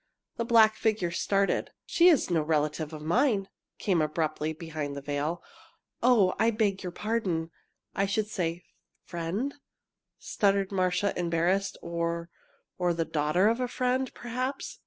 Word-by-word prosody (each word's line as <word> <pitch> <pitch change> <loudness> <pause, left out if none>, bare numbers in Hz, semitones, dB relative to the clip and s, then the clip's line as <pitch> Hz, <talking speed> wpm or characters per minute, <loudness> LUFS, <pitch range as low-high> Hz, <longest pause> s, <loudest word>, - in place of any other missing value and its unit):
The 235 - -1
black 220 -2 +5
figure 210 -6 0
started. 195 +3 +1 0.2
"She 345 - +4
is 310 - +4
no 165 -2 +3
relative 150 0 0
of 155 -1 -8
mine!" 195 - +2 0.3
came 180 -5 +1
abruptly 155 0 -1
from 160 - -9
behind 155 -4 -5
the 140 - -5
veil. 145 +4 -2 0.6
"Oh, 230 -7 +4
I 225 - +4
beg 210 -4 0
your 180 - -4
pardon, 185 -6 -2 0.4
I 195 +1 +1
should 210 +2 0
say 175 -5 -3 0.4
friend," 180 +11 -3 0.6
stuttered 195 -1 +1
Marcia, 185 +1 +1
embarrassed, 175 +3 0
"or 170 0 -3 0.5
or 175 -1 +1
the 165 -1 0
daughter 160 +5 +2
of 230 +2 +2
a 250 - 0
friend, 255 +1 0
perhaps." 255 +3 -4
185 Hz, 145 wpm, -28 LUFS, 165-220 Hz, 0.6 s, black